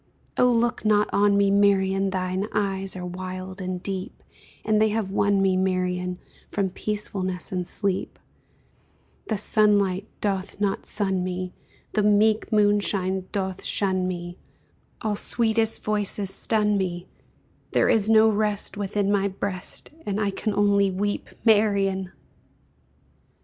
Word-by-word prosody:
Oh 250 - +4
look 240 0 +1
not 210 -1 +3
on 200 0 +4
me, 200 -1 +3
Marian, 195 -1 +3
Thine 185 +1 -2
eyes 195 -2 -1
are 180 -1 -5
wild 185 +1 -6
and 185 -1 -4
deep, 190 -1 -5 0.4
And 215 -1 +3
they 220 - +4
have 210 -3 -2
won 200 0 +2
me, 190 -1 +3
Marian, 180 -1 -1 0.3
From 195 -2 -1
peacefulness 190 -3 -4
and 180 -2 -2
sleep; 195 -3 -2 1.1
The 220 - -1
sunlight 205 -2 +2
doth 195 -1 -2
not 200 -1 -1
sun 190 -3 0
me, 185 0 -4 0.4
The 215 - +2
meek 210 +1 +3
moonshine 200 -3 +1
doth 190 -2 -3
shun 185 -2 0
me, 175 0 -5 0.6
All 215 -2 0
sweetest 225 +1 +1
voices 205 -2 0
stun 210 -2 +1
me 180 -1 -3 0.7
There - - +3
is 220 -1 +3
no 220 0 +6
rest 210 -1 0
Within 205 0 -1
my 200 -1 +2
breast 190 -1 -4 0.2
And 205 0 -1
I 205 -2 0
can 205 +1 -2
only 200 -1 +3
weep, 205 +2 -2 0.2
Marian! 200 -4 +3
200 Hz, 135 wpm, -25 LUFS, 185-210 Hz, 1.1 s, no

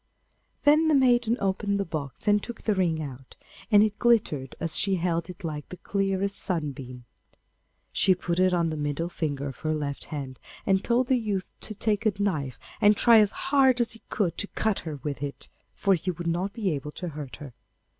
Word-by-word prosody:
Then 305 +2 +5
the 310 - +4
maiden 245 -3 +3
opened 200 +1 0
the 200 - 0
box 155 - -6
and 205 0 +4
took 235 +1 -8
the 215 - +2
ring 170 -5 0
out, 130 -2 -9 0.3
and 210 -2 +7
it 210 -1 -1
glittered 200 - +2
as 165 -1 0
she 195 -1 +2
held 170 -1 -1
it 180 +1 -10
like 150 -3 -5
the 180 - -8
clearest 195 0 -1
sunbeam. 135 -8 -2 0.9
She 190 -1 +3
put 175 0 -2
it 185 0 +4
on 170 -2 +1
the 155 - -3
middle 150 +3 -2
finger 145 -5 -3
of 135 - -10
her 155 0 -1
left 145 -2 -3
hand, 135 -4 -6 0.3
and 190 0 +2
told 245 +2 +2
the 255 0 +2
youth 205 -5 -3
to 215 - -6
take 215 +1 +1
a 210 - +2
knife 150 -11 -1 0.2
and 205 0 +6
try 230 -2 +7
as 210 -2 +4 0.2
hard 265 -3 +5
as 240 - +3
he 225 - -1
could 190 -6 -1
to 205 - -1
cut 215 -1 -1
her 155 -3 -5
with 140 -4 -4
it, 140 -1 -5 0.3
for 195 - +2
he 180 +1 -1
would 175 -1 -4
not 175 +4 -1
be 205 -4 -1
able 150 0 -4
to 180 - -5
hurt 145 -3 -7
her. 145 -4 -10
185 Hz, 205 wpm, -27 LUFS, 150-210 Hz, 0.9 s, and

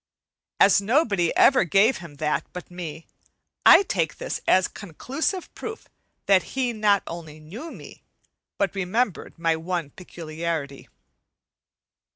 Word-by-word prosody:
As 200 0 +6
nobody 205 - +2
ever 270 - +5
gave 200 +8 +3
him 170 -4 -11
that 150 +1 -1
but 180 0 -9
me, 165 -3 -7 0.6
I - - +9
take 165 - -1
this - - -4
as 185 0 +4
conclusive 270 - -4
proof 445 0 -8 0.4
that 195 -2 +5 0.2
he 250 -2 +1
not 210 -2 +2
only 160 -2 -8
knew 205 - -9
me, - - -12 0.6
but 200 -3 0
remembered 195 +2 -2
my 165 -1 +1
one 165 -2 -4
peculiarity. 160 -4 -6
180 Hz, 125 wpm, -24 LUFS, 165-215 Hz, 0.6 s, I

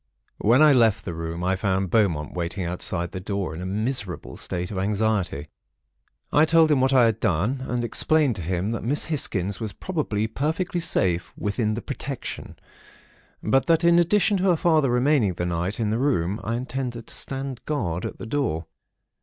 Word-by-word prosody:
"When 120 +8 +5
I 150 -2 +7
left 115 -5 +3
the 85 - -4
room, 85 +1 -5
I 95 +1 +1
found 95 -1 -1
Beaumont 85 -10 +1
waiting 90 +2 -3
outside 85 0 -2
the 95 - -5
door, 95 -3 -3
in 80 - -6
a 90 - -4
miserable 100 - -3
state 90 0 -3
of 95 - -3
anxiety. 100 -7 -1 0.8
I 150 - +6
told 160 0 +4
him 140 -3 +3
what 130 +1 +3
I 130 -3 +6
had 115 -3 +1
done, 105 - 0
and 125 -1 -1
explained 150 +1 +2
to - - -5
him 90 +5 -2
that 115 - -3
Miss 140 +6 +2
Hisgins 100 - -1
was 110 -3 -4
probably 145 - -2
perfectly 160 - -2
safe 95 - 0
within 105 +1 -1
the 120 - -5
'protection'; 140 -2 -6 0.9
but 135 0 +2
that, 165 0 +3
in 170 0 +5
addition 200 +4 +3
to 185 - -1
her 180 -3 +4
father 155 -5 +3
remaining 125 -4 +2
the 90 - -2
night 90 +4 -2
in 110 -2 0
the 110 - 0
room, 105 -8 0
I 115 +3 -2
intended 125 -2 -4
to - - -9
stand 135 -2 -4
guard 95 - -2
at - - -5
the - - -7
door. 110 - -1
110 Hz, 185 wpm, -24 LUFS, 95-140 Hz, 0.9 s, I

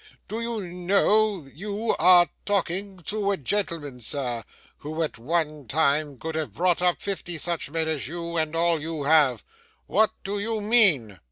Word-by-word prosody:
Do 225 +2 -4
you 230 -2 -3
know 195 +3 +2
that 135 -2 -16
you 210 +6 -2
are 175 +1 +7 0.2
talking 195 0 -1
to 200 +4 -1
a 200 - +1
gentleman, 150 -5 -3
sir, 120 -1 -2 0.4
who 155 +2 -3
at 150 - -4
one 150 0 -2
time 145 0 +1
could 160 +6 -5
have 155 -1 -4
bought 175 0 +2
up 180 -1 +2
fifty 185 -4 -4
such 170 -1 0
men 160 +1 -1
as 155 -6 -1
you 170 +2 -5
and 160 -1 -1
all 165 -1 +2
you 160 -1 -4
have? 140 -6 +4 0.4
What 215 +5 +3
do 200 +1 -3
you 220 +2 -2
mean? 185 - +3
170 Hz, 170 wpm, -25 LUFS, 150-200 Hz, 0.4 s, are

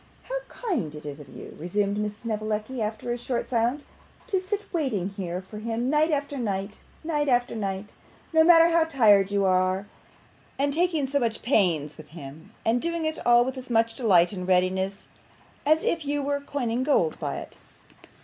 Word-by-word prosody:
'How - - -3
kind 320 - -3
it 150 - -10
is 145 0 -6
of 145 - -12
you,' - - -10
resumed 200 +5 0
Miss 210 0 -3
Snevellicci, 215 +2 -3
after 220 +3 -3
a 240 - -1
short 240 0 -2
silence, 245 +4 0 0.4
'to 380 - 0
sit 400 +2 -3
waiting 245 - 0
here 185 -2 -5
for 210 +3 -9
him 230 +3 -2
night 305 +2 +3
after 285 -2 -1
night, 200 -2 -3 0.2
night 300 -2 0
after 245 -1 +2
night, 200 -1 -4 0.4
no 320 0 +6
matter 335 0 +7
how 335 -1 +4
tired 215 -11 +4
you 200 -1 +1
are; 185 +1 +2 0.7
and 280 +1 +1
taking 330 -3 +1
so 280 +2 0
much 230 -3 -2
pains 165 - +1
with 155 - -11
him, 155 0 -11
and 235 +2 +2
doing 335 -1 -1
it 315 0 -2
all 240 0 +6
with 260 0 -4
as 255 - -9
much 225 -1 +2
delight 195 -7 +4
and 180 -2 -5
readiness 190 +1 +1 0.6
as 310 +1 +4
if 335 -2 0
you 290 0 -1
were 285 0 0
coining 250 -4 -2
gold 260 - +2
by - - -3
it! - - -9
230 Hz, 185 wpm, -26 LUFS, 195-285 Hz, 0.7 s, matter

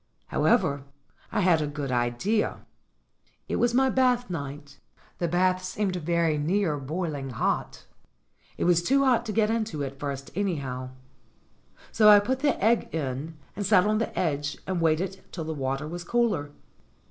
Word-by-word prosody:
How - - 0
ever, 160 - +3 0.5
I 210 - +1
had 175 -4 +4
a 150 - -1
good 145 -2 -4
idea. 125 - 0 0.8
It - - -1
was 240 0 +2
my 265 0 +4
bath 250 -4 +2
night. 145 -2 -6 0.4
The 170 - 0
bath 185 +2 +1
seemed 190 0 -2
very 170 -2 +1
near 165 -1 0
boiling 145 -1 -4
hot; 120 - -2 0.7
it - - -1
was 175 -1 +4
too 275 +10 +3
hot 240 -2 +2
to - - -2
get 215 0 +2
into 220 -10 -2
at 135 0 -6
first, 140 -1 -5
anyhow. 140 -10 -2 1.0
So 215 -1 +6
I 210 - +10
put 255 +6 -1
the 290 -1 +1
egg 230 +1 +3
in, 150 +1 -4 0.2
and 205 - -3
sat 195 -2 +4
on 215 0 +2
the 225 - -3
edge 145 -4 -1
and 185 -2 -2
waited 180 +4 0
till 165 - -5
the 160 0 -4
water 135 +1 -2
was 175 +2 -6
cooler. 210 -9 0
175 Hz, 165 wpm, -27 LUFS, 145-210 Hz, 1.0 s, I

